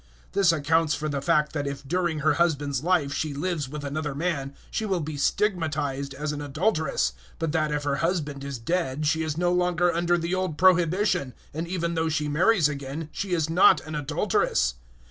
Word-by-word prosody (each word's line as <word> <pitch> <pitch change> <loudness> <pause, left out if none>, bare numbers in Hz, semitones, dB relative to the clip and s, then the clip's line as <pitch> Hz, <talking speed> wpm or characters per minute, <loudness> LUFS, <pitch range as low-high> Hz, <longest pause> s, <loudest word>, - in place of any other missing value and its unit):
007:003 - - -31
This 195 -3 +4
accounts 160 0 +2
for 155 0 -3
the 140 -1 -2
fact 150 -1 +2
that 145 -2 -2
if 140 0 -6
during 175 -1 0
her 155 - +3
husband's 145 -5 0
life 165 -5 +2
she 145 0 -2
lives 155 -3 -2
with 150 +1 -6
another 145 0 -3
man, 140 -4 -2 0.2
she - - -2
will 195 -4 0
be 155 -1 -4
stigmatized 145 -6 -1
as 150 +2 -3
an 145 0 -4
adulteress; 155 +2 0 0.2
but 165 -2 -1
that 155 -1 0
if 150 0 -1
her 140 -1 0
husband 150 -5 -1
is 140 -2 -4
dead 155 +2 -1
she 160 +2 +2
is 155 -1 -2
no 175 0 +2
longer 175 -1 +2
under 175 +1 +2
the 170 +1 -2
old 185 -5 -1
prohibition, 180 -4 +3 0.2
and 160 +3 -3
even 170 -1 -2
though 160 -1 0
she 150 -1 -1
marries 165 +3 +3
again, 145 +2 -5
she 190 +3 -3
is 160 -3 +1
not 165 +3 +5
an 155 - -8
adulteress. 145 - +1
155 Hz, 200 wpm, -26 LUFS, 145-175 Hz, 0.2 s, not